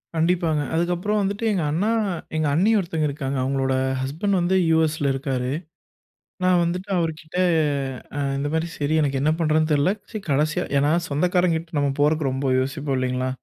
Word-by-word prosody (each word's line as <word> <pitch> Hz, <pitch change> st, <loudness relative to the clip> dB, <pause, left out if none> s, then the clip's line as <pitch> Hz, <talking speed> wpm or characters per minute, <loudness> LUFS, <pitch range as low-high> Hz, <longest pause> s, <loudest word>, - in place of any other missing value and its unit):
கண்டிப்பாங்க. 165 Hz, -2 st, +1 dB
அதுக்கப்புறம் 175 Hz, +5 st, 0 dB
வந்துட்டு 200 Hz, +3 st, -2 dB
எங்க 180 Hz, -5 st, 0 dB
அண்ணா 185 Hz, +8 st, 0 dB, 0.5 s
எங்க 155 Hz, -1 st, +1 dB
அண்ணி 195 Hz, +8 st, +3 dB
ஒருத்தர் 165 Hz, -4 st, -1 dB
இருக்காங்க. 140 Hz, -1 st, -3 dB
அவங்களோட 135 Hz, 0 st, 0 dB, 0.3 s
ஹஸ்பண்ட் 165 Hz, +9 st, -1 dB
வந்து 175 Hz, +2 st, +1 dB
யுஎஸ்ல 155 Hz, -3 st, +2 dB
இருக்காரு. 130 Hz, -2 st, -2 dB, 0.9 s
நான் 180 Hz, -1 st, +4 dB
வந்துட்டு 180 Hz, +4 st, -3 dB
அவருகிட்ட 160 Hz, 0 st, -3 dB, 1.0 s
இந்த 140 Hz, +1 st, -2 dB
மாதிரி 160 Hz, +1 st, 0 dB
சரி, 145 Hz, +1 st, -1 dB
எனக்கு 140 Hz, -2 st, 0 dB
என்ன 150 Hz, +2 st, +3 dB
பண்ணுறதுன்னு 155 Hz, -1 st, +2 dB
தெரில. 145 Hz, +5 st, +3 dB, 0.4 s
கடைசியா 150 Hz, +2 st, +1 dB, 0.2 s
ஏன்னா, 145 Hz, +2 st, +2 dB, 0.2 s
சொந்தக்காரங்க 175 Hz, +3 st, +2 dB
கிட்ட 165 Hz, -1 st, -7 dB
நம்ம 140 Hz, -1 st, +1 dB
போறதற்கு 150 Hz, -1 st, +2 dB
ரொம்ப 135 Hz, +1 st, -2 dB
யோசிப்போம் 135 Hz, +1 st, -2 dB
இல்லைங்களா? 130 Hz, 0 st, -1 dB
155 Hz, 145 wpm, -23 LUFS, 140-175 Hz, 1.0 s, நான்